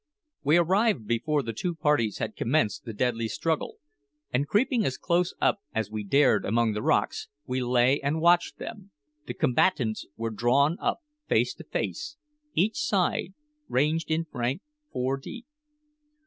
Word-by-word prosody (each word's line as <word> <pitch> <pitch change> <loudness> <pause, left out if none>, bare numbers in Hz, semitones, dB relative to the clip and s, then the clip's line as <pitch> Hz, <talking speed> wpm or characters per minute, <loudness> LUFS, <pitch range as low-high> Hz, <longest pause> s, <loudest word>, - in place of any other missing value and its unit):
We 150 +3 +4
arrived 190 - +2
before 135 +7 0
the 115 - -4
two 170 +10 -3
parties 150 -9 +1
had 110 -1 -4
commenced 120 -5 0
the 115 - -5
deadly 115 0 0
struggle, 160 +7 -2 0.6
and 140 +4 +1
creeping 235 - +2
as 130 - -1
close 175 +1 0
up - - +2 0.2
as 110 -2 -1
we 110 -1 -3
dared 140 +9 +3
among 115 +1 +1
the 105 - -3
rocks, - - +1 0.2
we 130 0 -2
lay 125 +2 +3
and 145 +3 0
watched 175 +1 +3
them. 200 -3 -8 0.4
The - - -4
combatants 125 -5 +1
were 115 0 -2
drawn 130 - +2
up - - -1 0.3
face - - +2
to - - -12
face, 295 - -4 0.4
each 210 - +2
side 195 -8 0 0.3
ranged 155 +5 +1
in 160 +1 0
rank 125 - -2 0.3
four 130 +2 -1
deep. 235 - -9
140 Hz, 155 wpm, -27 LUFS, 120-175 Hz, 0.6 s, We